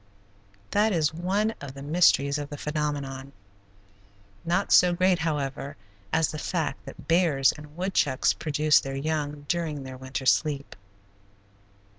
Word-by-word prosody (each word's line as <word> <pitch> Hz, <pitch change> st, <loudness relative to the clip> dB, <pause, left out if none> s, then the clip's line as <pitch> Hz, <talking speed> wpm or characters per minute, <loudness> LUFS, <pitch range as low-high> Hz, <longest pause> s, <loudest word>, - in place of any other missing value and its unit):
That 210 Hz, +1 st, +3 dB
is 155 Hz, -3 st, +1 dB
one 195 Hz, +6 st, 0 dB
of 140 Hz, -1 st, -8 dB
the 135 Hz, -, -8 dB
mysteries 145 Hz, -2 st, +3 dB
of 145 Hz, 0 st, -5 dB
the 145 Hz, -, -7 dB
phenomenon, 140 Hz, -3 st, -3 dB, 1.1 s
not 175 Hz, +4 st, 0 dB
so 180 Hz, -1 st, +6 dB
great, 185 Hz, 0 st, +2 dB
however, 140 Hz, -3 st, -3 dB, 0.3 s
as 160 Hz, -1 st, +2 dB
the 155 Hz, -, -6 dB
fact 160 Hz, -4 st, -3 dB
that -, -, -11 dB
bears 165 Hz, -6 st, +3 dB
and 150 Hz, 0 st, -13 dB
woodchucks 175 Hz, -8 st, +1 dB
produce 155 Hz, 0 st, +2 dB
their 135 Hz, -2 st, -5 dB
young 145 Hz, 0 st, -3 dB
during 160 Hz, -4 st, -2 dB
their 130 Hz, -1 st, -8 dB
winter 130 Hz, +1 st, -5 dB
sleep. 145 Hz, 0 st, +1 dB
150 Hz, 135 wpm, -26 LUFS, 140-170 Hz, 1.1 s, so